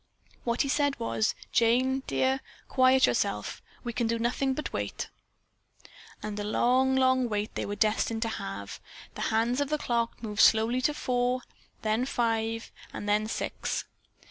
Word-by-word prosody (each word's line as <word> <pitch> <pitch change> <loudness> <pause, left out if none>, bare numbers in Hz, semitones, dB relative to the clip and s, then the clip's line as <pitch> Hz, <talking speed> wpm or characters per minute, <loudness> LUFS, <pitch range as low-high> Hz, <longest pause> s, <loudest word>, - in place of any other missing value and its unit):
What 235 +2 +1
he - - -2
said 285 0 +1
was, 220 -1 0 0.2
"Jane, 255 +3 +3
dear, 265 +1 +1 0.3
quiet 260 0 +5
yourself. - - -1 0.2
We 240 -1 -4
can 235 0 0
do 230 +1 0
nothing 250 +3 0
but 305 - -4
wait." - - -3 1.1
And 210 -1 -4
a - - -2
long, 255 +5 +3
long 260 -1 +3
wait 210 0 -2
they - - -3
were 205 - -3
destined 225 +1 +1
to - - -1
have. 100 - -6 0.3
The - - -7
hands 235 +4 +1
of 285 - -1
the 305 - +1
clock 235 -4 -1
moved 210 -1 0
slowly 230 +3 +5
to 295 +3 +1
four, 250 -1 0 0.4
then 220 +3 +1
five 225 -2 -1 0.2
and 205 - -6
then 210 +1 +2
six. - - -3
235 Hz, 160 wpm, -29 LUFS, 220-260 Hz, 1.1 s, quiet